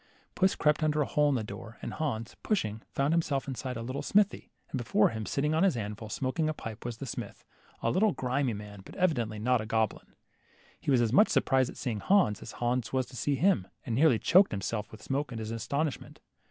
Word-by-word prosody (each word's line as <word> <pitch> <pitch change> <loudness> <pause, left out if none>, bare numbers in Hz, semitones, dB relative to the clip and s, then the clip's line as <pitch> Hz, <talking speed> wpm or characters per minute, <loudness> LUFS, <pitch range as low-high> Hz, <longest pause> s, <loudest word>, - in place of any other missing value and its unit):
Puss 190 0 +2
crept 150 0 +2
under 150 -1 +2
a - - -3
hole 150 +1 +2
in 140 - +2
the 115 - -1
door, 110 +1 -9
and - - -4
Hans, 125 -7 -3
pushing, 110 - -1
fdhnd 140 +2 +2
himself 155 -5 0
in 135 - -2
a 125 -2 -4
little 130 +4 -4
smithy, 205 0 +2 0.2
and 130 - -2
before 110 -2 +3
him, 110 -2 -5
sitting 150 +2 0
on 160 - +2
his 190 -9 +3
anvil, 105 0 -5
smoking 135 +8 -1
a 155 - -2
pipe, 110 -3 -7
was 120 -2 -4
the 140 - -6
smith, 125 - -7 0.4
a 115 - +2
little, 205 +3 +3
grimy 130 -3 -1
man, 100 -1 -9
but - - -12
evidently 120 -12 0
not 115 0 +1
goblin. 110 -1 -1 0.6
He - - -5
was 130 -3 +4
as 115 -1 +1
much 210 +10 +6
surprised 130 -2 +2
at - - -10
seeing 115 -4 -2
Hans, 110 - +3
as - - -8
Hans 120 -1 -1
was 130 -1 +1
to 125 +1 -13
see 140 +3 0
him, 145 - +2 0.2
and 120 - -2
nearly 135 0 +5
choked 185 - +5
himself 105 +2 -3
with 110 - -12
smoke 140 0 -2
in 115 - -5
his 110 0 -4
astonishment. 140 +6 -3
125 Hz, 220 wpm, -30 LUFS, 110-150 Hz, 0.6 s, much